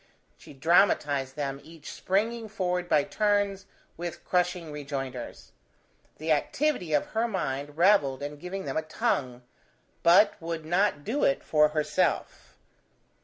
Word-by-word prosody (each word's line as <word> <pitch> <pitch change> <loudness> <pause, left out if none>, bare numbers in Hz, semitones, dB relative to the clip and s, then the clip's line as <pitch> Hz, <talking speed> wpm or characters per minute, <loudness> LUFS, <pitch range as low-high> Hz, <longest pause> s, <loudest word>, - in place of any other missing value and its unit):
She 145 - -14
dramatized 145 -3 +2
them 140 -1 -3
each 160 -1 -11
springing 220 +4 -1
forward 180 -3 -2
by 150 - +4
turns, 205 -1 0 0.3
with 170 0 -6
crushing 180 -2 0
rejoinders. 135 -4 -6 0.7
The 160 +1 -2
activity 185 - 0
of 145 - +2
her 225 +1 +1
mind 145 - -3
revelled 165 -8 +3
in 145 +1 -5
giving 185 +5 -6
them - - -3
a - - +1
tongue, 140 - -2 0.6
but 190 +4 +5
would 165 -1 -4
not 175 -2 +1
do 260 - -1
it 135 - +2
for 150 -1 +4
herself. 155 0 -1
165 Hz, 130 wpm, -27 LUFS, 145-195 Hz, 0.7 s, but